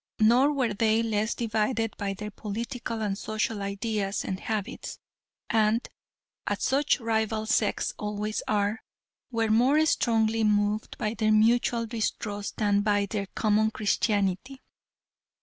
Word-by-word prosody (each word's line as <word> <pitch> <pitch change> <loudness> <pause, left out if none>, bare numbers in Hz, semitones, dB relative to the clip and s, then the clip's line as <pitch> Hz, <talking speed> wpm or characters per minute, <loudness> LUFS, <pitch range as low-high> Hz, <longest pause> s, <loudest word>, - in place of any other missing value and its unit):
Nor 240 +6 +5
were 255 -6 0
they 220 +2 +2
less 220 0 0
divided 225 0 -1
by 195 -1 -3
their 210 +2 -6
political 225 +2 -4
and 200 -2 -1
social 215 0 -2
ideas 200 0 -2
and 190 -1 -3
habits, 220 +2 -4 0.5
and, 220 +1 +2 0.6
as - - -1
such 280 +1 +2
rival 220 -2 -1
sects 220 -1 +1
always 210 +1 -3
are, 210 +1 0 0.5
were 225 -3 0
more 265 +8 +4
strongly 225 -5 +2
moved 210 0 +1
by 215 -2 -1
their 215 -2 +1
mutual 230 +2 +3
distrust 210 -2 -3
than 205 -2 +2
by 205 -1 +2
their 200 0 -3
common 215 0 +2
Christianity. 210 +3 -1
215 Hz, 130 wpm, -27 LUFS, 210-230 Hz, 0.6 s, Nor